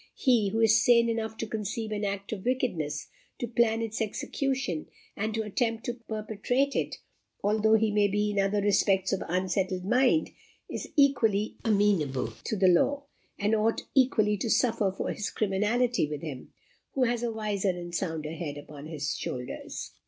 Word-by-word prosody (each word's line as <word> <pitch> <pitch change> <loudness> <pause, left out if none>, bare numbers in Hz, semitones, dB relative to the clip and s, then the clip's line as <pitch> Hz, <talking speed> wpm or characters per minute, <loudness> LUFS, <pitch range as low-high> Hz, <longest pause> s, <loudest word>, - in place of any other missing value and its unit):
He 235 -7 +3
who 225 +3 0
is 225 0 +5
sane 235 -1 +5
enough 220 -1 -2
to - - -3
conceive 215 0 -4
an 210 0 -2
act 200 +1 -3
of 195 -3 -6
wickedness, 240 - -1 0.3
to 240 - -3
plan 230 -1 +2
its 225 0 -3
execution, 255 - -2 0.3
and 215 +2 -2
to 220 - 0
attempt 225 +1 -1
to 240 - -2
perpetrate 230 +4 -2
it, - - -1 0.5
although 215 +2 +4
he 220 -1 +2
may 205 -1 +3
be 210 +1 0
in 205 - 0
other 195 +1 +2
respects 195 -1 +2
of 190 - -1
unsettled 185 +1 -1
mind, 255 +8 +3 0.4
is - - -5
equally 230 - +3
amenable 190 - +1
to - - -1
the 190 -2 +3
law, 275 +11 +3 0.3
and 210 +1 +1
ought 220 +1 +2
equally 215 -6 +3
to 225 +3 -2
suffer 225 -4 +2
for 190 - -3
his 215 - -3
criminality 215 0 +1
with 150 -1 -5
him 140 -6 -7 0.4
who 265 - +2
has 240 -1 +1
a 240 -1 -1
wiser 210 -3 -1
and 175 -1 -4
sounder 160 -4 -2
head 155 -3 -5
upon 145 0 -10
his 145 -3 -3
shoulders." 125 -1 -5
210 Hz, 170 wpm, -28 LUFS, 190-230 Hz, 0.5 s, is